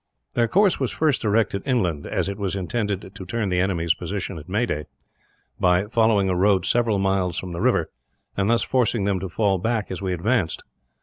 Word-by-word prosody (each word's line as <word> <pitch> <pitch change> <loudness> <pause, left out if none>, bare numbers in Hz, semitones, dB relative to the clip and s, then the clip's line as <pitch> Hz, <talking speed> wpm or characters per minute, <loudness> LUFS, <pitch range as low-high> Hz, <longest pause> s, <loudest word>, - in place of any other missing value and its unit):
Their 120 -1 +2
course 195 - +3
was 130 -3 0
first 155 -4 +1
directed 105 -2 +1
inland; 95 - 0
as - - -1
it 100 +1 -4
was 100 -1 -2
intended 100 0 -3
to 100 - -8
turn 110 +1 -2
the 90 -1 +1
enemy's 85 -3 +1
position 90 -2 -5
at 75 - -13
Meaday, 100 -7 -1 0.7
by 90 +2 +3
following 110 -3 +2
a 95 - +1
road 95 0 +3
several 115 -3 +2
miles 95 -3 0
from 90 - -4
the 85 - -4
river, 110 -9 +1 0.4
and 100 +1 0
thus 115 0 +3
forcing 120 -4 +1
them 100 -1 0
to 95 +1 -5
fall 100 0 +1
back 110 +1 -1
as 95 - -5
we 95 -1 -2
advanced. 95 +1 0
100 Hz, 195 wpm, -23 LUFS, 90-115 Hz, 0.7 s, course